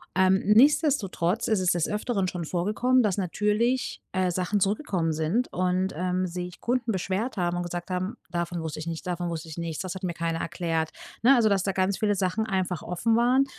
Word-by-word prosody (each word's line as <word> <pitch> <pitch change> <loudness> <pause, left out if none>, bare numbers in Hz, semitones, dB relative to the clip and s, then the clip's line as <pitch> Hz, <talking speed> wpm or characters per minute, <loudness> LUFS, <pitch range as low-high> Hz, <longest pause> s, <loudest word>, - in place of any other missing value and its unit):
Ähm, 190 +1 +4
nichtsdestotrotz 225 - +3
ist 220 -3 +2
es 180 -1 +2
des 175 -2 +1
Öfteren 210 -2 -1
schon 175 -2 -4
vorgekommen, 210 +10 +2
dass 210 -5 +1
natürlich, 210 +7 0
äh, 185 -1 +1
Sachen 185 +3 0
zurückgekommen 195 - 0
sind 160 +11 0
und, 185 +1 0
ähm, 185 +2 0
sich 180 0 -6
Kunden 245 -1 0
beschwert 195 +5 -2
haben 175 -2 0
und 175 - -1
gesagt 175 +1 -5
haben: 185 +2 -2 0.2
„Davon 175 -1 -2
wusste 160 -1 -5
ich 155 - -5
nichts. 165 -1 -4
Davon 175 -1 -2
wusste 165 -1 -5
ich 160 - -9
nichts. 165 -2 -3
Das 185 -1 -5
hat 190 - -8
mir 175 -2 -1
keiner 165 0 -2
erklärt.“ 165 -2 -2 0.3
Ne, 265 +4 +7
also, 230 -3 +4
dass 195 -2 +2
da 195 - 0
ganz 190 +1 0
viele 210 -1 +1
Sachen 195 +3 0
einfach 185 -4 -1
offen 220 +6 0
waren, 250 +3 +4
185 Hz, 205 wpm, -26 LUFS, 175-210 Hz, 0.3 s, Ne